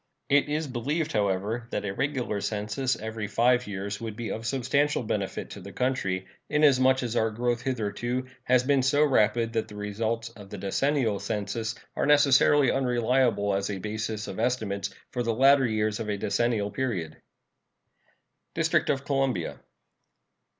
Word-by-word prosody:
It 145 +1 +3
is 155 +2 -1
believed, 145 +5 -2
however, 105 +3 0
that - - -3
a 95 - -2
regular 125 -5 -2
census 110 +6 -1
every 110 -1 -5
five 120 +3 +2
years 100 +1 -4
would 110 -2 -5
be 115 0 -4
of 115 +1 -4
substantial 140 +2 +1
benefit 100 -3 -3
to 100 - -8
the 100 +2 -9
country, 100 -8 -1 0.2
inasmuch 130 -3 +4
as 120 -1 -3
our 110 -1 +2
growth 120 +2 -1
hitherto 120 +1 -2 0.2
has 125 0 +4
been 140 0 +3
so 145 +3 +3
rapid 115 -4 +2
that 110 -1 -1
the 105 - -11
results 110 +3 -2
of 105 -4 -13
the 105 - -7
decennial 110 +2 0
census 110 +2 -3 0.2
are - - 0
necessarily 145 -1 +5
unreliable 120 -5 +1
as 100 +1 -1
a 100 - -3
basis 110 +2 -4
of 95 - -6
estimates 110 -5 -1 0.2
for 125 - -2
the 115 -2 0
latter 135 +1 +5
years 110 -1 0
of 110 -2 -4
a 105 - -1
decennial 110 -1 0
period. 100 -10 -3 1.4
DISTRICT - - +1
OF 135 0 0
COLUMBIA. 135 - -1
115 Hz, 155 wpm, -27 LUFS, 105-130 Hz, 1.4 s, necessarily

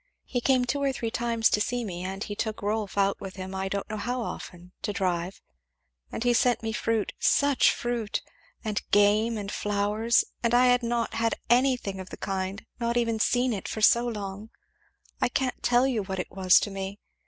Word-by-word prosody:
He 245 - -2
came 255 0 +3
two 280 +3 -1
or 275 -1 +2
three 230 -3 -3
times 230 -1 +1
to 210 - +2
see 245 +2 -1
me 180 -3 -5
and 195 +2 -4
he 205 - -5
took 215 0 -3
Rolf 210 -1 -2
out 200 0 +2
with 195 -1 -7
him 190 0 -6
I 190 0 -2
don't 200 0 -3
know 215 - -4
how 245 +4 -2
often, 180 -4 -8
to - - -2
drive; 180 -2 -2 0.7
and - - -3
he 245 0 +3
sent 240 0 +2
me 220 0 -2
fruit 225 -1 -1
such 285 -2 +4
fruit! 240 -3 -2 0.4
and 210 -1 -1
game, 210 +3 +4
and 200 -1 -5
flowers; 210 +3 +1 0.2
and 235 0 +2
I 250 +1 +6
had 245 0 +4
not 235 -1 -1
had 225 0 +1 0.2
anything 245 -6 +2
of 185 0 -8
the - - -8
kind, 190 +1 -3
not 235 0 0
even 230 -2 +1
seen 245 +2 +2
it, 200 - -4
for 215 - -4
so 235 +2 +5
long 205 -1 -5 0.7
I - - +3
can't 255 0 -1
tell 245 +1 +3
you 250 -5 0
what 190 -1 -4
it 180 - -4
was 185 -1 +5
to 205 - -3
me. 195 +1 -5
220 Hz, 205 wpm, -27 LUFS, 195-240 Hz, 0.7 s, I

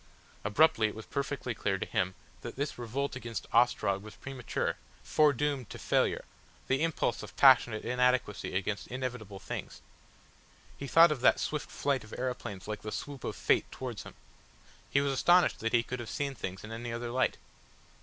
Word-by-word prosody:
Abruptly 110 +1 +4
it 105 - -6
was 110 - -8
perfectly 140 -3 -3
clear 100 -3 -1
to - - -3
him 95 0 -1 0.3
that - - -7
this 140 -1 -3
revolt 130 +4 -2
against 115 -7 -5
Ostrog 110 -5 +3
was 110 +1 -11
premature, 135 -3 -3 0.3
foredoomed 145 -4 +2
to - - -7
failure, - - +1 0.4
the 135 +2 +1
impulse 165 -1 0
of - - -10
passionate 120 -5 +6
inadequacy 125 -5 +1
against 100 +2 -2
inevitable 125 -6 -5
things. - - -6 1.0
He 140 - -6
thought 165 +3 +7
of 140 -5 -2
that - - +5
swift 150 -1 -2
flight 140 -4 -1
of 110 - -13
aeroplanes 125 -7 -4
like 105 -1 -4
the 105 - -5
swoop 140 +2 -6
of - - -3
Fate - - +1
towards 125 -5 -5
him. - - -11 0.7
He 140 - +3
was 140 -1 0
astonished 175 +6 +4
that 115 0 -1
he 120 -1 +4
could 125 +1 -5
have 115 -2 -6
seen 140 -1 -2
things 95 -6 -6
in 110 - -8
any 115 +1 -5
other 120 0 -4
light. 130 - +1
125 Hz, 175 wpm, -31 LUFS, 110-140 Hz, 1.0 s, thought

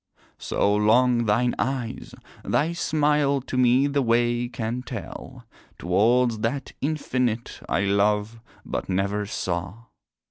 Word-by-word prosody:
So 100 - +1
long 120 +3 +3
thine 120 +4 +2
eyes, 130 -4 -3 0.3
thy 160 +3 0
smile, 150 -3 +1
to 130 - -7
me 125 +2 +4
the 140 0 +1
way 120 0 +1
can 120 0 -3
tell 130 - -8 0.3
Towards 115 +6 +2
that 125 +5 -2
Infinite 130 -6 -2
I - - +1
love, 105 +2 +1 0.3
but - - -4
never 100 +2 -1
saw. 90 +3 -4
120 Hz, 115 wpm, -24 LUFS, 105-130 Hz, 0.3 s, me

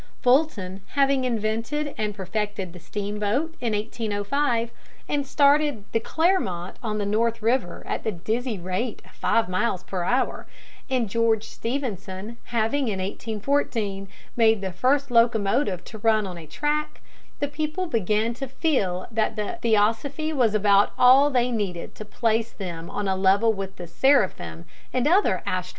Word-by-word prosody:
Fulton 245 -9 +1
having 275 -2 +3
invented 230 +6 -1
and 210 -1 -2
perfected 200 -2 -3
the 180 - -10
steamboat 210 - -2
in 235 -3 0
1805 225 +3 -1 0.4
and 285 -2 -1
started 285 -5 +3
the 225 - +2
Clermont 225 - 0
on 215 -3 -2
the 205 - -1
North 230 +2 0
River 230 -5 0
at - - -3
the 220 - 0
dizzy 220 +6 -2
rate 185 +6 -3
of - - -18
five 230 - +1
miles 185 0 -1
per 185 -2 -4
hour, 245 +9 0 0.4
and 255 -3 +1
George 225 +1 +2
Stephenson 225 -4 -4
having 240 +4 0
in 205 -3 -1
1814 210 0 -2 0.3
made 225 -3 +4
the 190 -1 -3
first 270 +7 +1
locomotive 230 -3 +2
to 220 - -10
run 215 -1 +3
on 185 -2 -6
a 165 -2 -10
track, 295 - -2 0.4
the 290 - 0
people 310 +5 -2
began 220 - 0
to 270 +3 -5
feel 245 - 0
that 220 +7 -1
theosophy 230 +8 +1
was 235 -7 +2
about 205 -1 +4
all 265 +3 +7
they 250 -2 +1
needed 195 -7 -3
to 215 - -9
place 225 +1 0
them 170 -4 -6
on 205 -1 -3
a 190 - +1
level 195 +4 +3
with 195 -1 -5
the 175 - -7
seraphim 170 - +1 0.3
and 255 +2 +1
other 340 - +3
astral - - -1
bodies. 180 - -12
220 Hz, 155 wpm, -25 LUFS, 200-260 Hz, 0.4 s, all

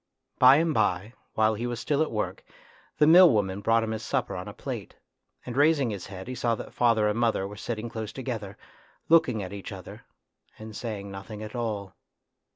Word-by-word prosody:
By 130 +1 +8
and 160 +1 +2
by, 105 -1 0 0.2
while 110 0 +3
he 115 +3 -3
was 120 -2 -4
still 145 0 0
at 155 - +1
work, 105 -2 -3 0.5
the 150 - +5
mill 175 +3 +8
woman 100 -4 0
brought 115 +2 +3
him 110 - -3
his 110 0 -3
supper - - -2
on - - -6
a - - -6
plate, - - -7 0.5
and 120 - -6
raising 145 -3 +3
his 100 -3 -6
head 95 0 -9
he 130 - -4
saw 120 -2 0
that - - -9
father 115 -3 +3
and 105 +2 0
mother 115 -5 +1
were 105 - -9
sitting 110 +1 -4
close 110 -2 -5
together, 115 -7 -5 0.5
looking 145 -10 +4
at 95 - -7
each 100 -1 -7
other, - - -10 0.5
and 110 0 -10
saying 105 -4 -5
nothing 105 +2 -8
at 110 - -8
all. 105 -5 -3
110 Hz, 200 wpm, -27 LUFS, 105-125 Hz, 0.5 s, By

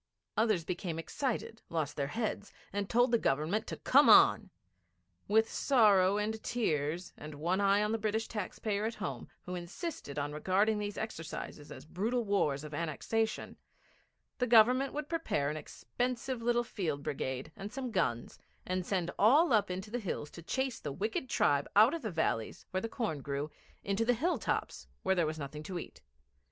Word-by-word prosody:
Others 215 -7 +2
became 175 -2 -3
excited, 225 - -3
lost 155 -3 -2
their 140 -1 -1
heads, 210 +1 -3 0.2
and 200 -1 -2
told 245 +1 +3
the 235 - +4
Government 155 +9 0
to - - -5
come - - +5
on. - - +7 0.8
With 220 +2 +4
sorrow 205 -9 +4
and 215 +1 -2
tears, 170 -7 -1
and 150 0 -9
one 175 +6 0
eye 200 +1 +4
on 210 - 0
the 225 - 0
British 220 +1 -1
taxpayer 210 0 -3
at 230 +1 -2
home, 210 - -5 0.2
who 180 - -6
insisted 175 - -6
on 145 0 -2
regarding 200 +7 +2
these 205 -1 -4
exercises 165 -7 -6
as - - -9
brutal 225 +9 -1
wars 150 -9 +1
of 150 0 -8
annexation, 190 +8 -2 0.8
the 250 - +1
Government 245 +4 +5
would 300 0 -4
prepare 295 - -1
an 155 - -4
expensive 245 - -3
little 240 +1 +2
field 160 -11 -3
brigade 130 0 -3
and 200 +2 -7
some 255 -1 -4
guns, 130 - -1 0.3
and 185 0 -1
send 180 -2 -1
all 280 +8 +6
up 205 -3 +3
into 185 +3 -5
the 245 - -1
hills 170 -8 -4
to 170 - -10
chase 260 +7 -2
the 145 - -5
wicked 215 - -2
tribe 140 -8 +2
out 220 +7 +7
of 335 - -3
the 220 - -3
valleys, 160 - -1
where 185 - -1
the 225 - -3
corn 210 - -2
grew, 140 +2 -3 0.3
into 200 +3 0
the 245 +1 +3
hill 330 +10 0
tops - - -2 0.2
where 190 - +3
there 175 -4 +2
was 155 +1 -3
nothing 150 0 -6
to 180 +4 -5
eat. 70 - -8
200 Hz, 180 wpm, -32 LUFS, 160-225 Hz, 0.8 s, on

